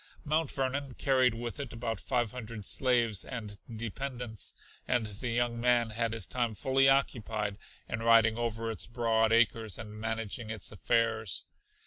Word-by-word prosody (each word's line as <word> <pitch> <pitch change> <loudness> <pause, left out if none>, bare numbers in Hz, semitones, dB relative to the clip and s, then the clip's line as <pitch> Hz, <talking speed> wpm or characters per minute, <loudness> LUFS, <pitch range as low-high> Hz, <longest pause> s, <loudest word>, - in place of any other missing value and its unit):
Mount 155 0 +1
Vernon 135 0 -2
carried 130 -3 +3
with 120 +4 -5
it 140 -4 -5
about 115 -3 -3
five 120 -4 0
hundred 115 -4 -7
slaves 120 -5 +3
and 105 -5 -6 0.2
dependents, 120 0 -4 0.3
and 125 -3 +2
the 110 +4 -5
young 120 0 0
man 120 -2 +3
had 115 0 0
his 115 - -1
time 120 -3 -1
fully 135 +2 +4
occupied 110 -6 0 0.3
in 115 - -3
riding 115 -1 +5
over 115 -1 -2
its 110 - -4
broad 115 -2 +2
acres 115 -2 +2
and 110 -2 -8
managing 110 0 -3
its 110 -3 -2
affairs. 110 0 +1
115 Hz, 150 wpm, -31 LUFS, 110-125 Hz, 0.3 s, riding